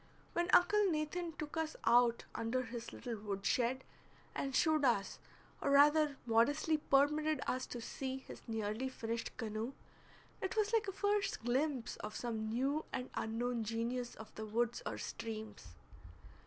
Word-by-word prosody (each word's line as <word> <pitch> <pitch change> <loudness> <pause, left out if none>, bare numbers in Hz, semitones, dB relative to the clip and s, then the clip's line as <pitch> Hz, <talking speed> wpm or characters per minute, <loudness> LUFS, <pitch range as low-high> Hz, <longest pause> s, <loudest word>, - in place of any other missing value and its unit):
When 345 +1 +1
Uncle 420 +4 +6
Nathan 325 +2 -1
took 305 0 -6
us 320 -1 -1
out 235 0 +4
under 245 +3 -1
his 235 0 -6
little 235 -3 -5
wood 200 -2 -4
shed, 255 +1 +1 0.5
and 270 -1 -2
showed 315 -3 +4
us, 235 -7 +2 0.4
or - - +1
rather 295 +1 +5
modestly 290 +7 +3
permitted 300 +2 +3
us 255 0 -1
to 240 - -6
see, 265 +3 -4
his 265 - -10
nearly 220 +3 -2
finished 230 -2 -4
canoe, 225 +2 -3 0.7
it 380 +3 -2
was 425 +1 +2
like 450 -3 +3
a - - -1
first 405 - 0
glimpse 255 +1 0
of 210 0 -6
some 220 -3 -2
new 270 +7 0
and 250 - -4
unknown 230 +1 -1
genius 235 +3 -2
of 220 - -11
the 220 - -6
woods 235 +2 0
or - - -3
streams. 215 - -6
250 Hz, 155 wpm, -36 LUFS, 230-305 Hz, 0.7 s, Uncle